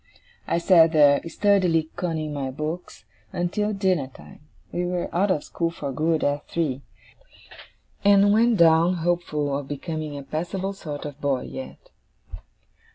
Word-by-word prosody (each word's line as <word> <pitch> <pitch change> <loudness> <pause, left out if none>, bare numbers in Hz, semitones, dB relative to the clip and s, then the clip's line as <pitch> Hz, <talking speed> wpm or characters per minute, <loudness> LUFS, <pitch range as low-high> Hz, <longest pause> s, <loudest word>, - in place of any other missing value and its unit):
I - - +1
sat 170 -2 +5
there, 145 -2 +5
sturdily 180 -4 +2
conning 160 -4 -3
my 140 -2 -3
books, 155 +6 -6 0.3
until 210 +5 -1
dinner 190 -8 0
time 75 - -15 0.3
(we 175 - -2
were 180 0 -3
out 195 +4 +2
of 155 -6 +1
school 170 -1 -2
for 145 -4 -5
good 155 +4 0
at 145 +1 -1
three); 145 -6 -2 1.2
and 200 0 +5
went 230 +1 +3
down, 170 +1 +5
hopeful 160 -4 -1
of 140 -1 -4
becoming 155 0 -5
a 140 - -7
passable 175 +7 -3
sort 150 -7 -7
of 145 0 -8
boy 135 -3 0
yet. 265 - -9
165 Hz, 145 wpm, -24 LUFS, 145-180 Hz, 1.2 s, sat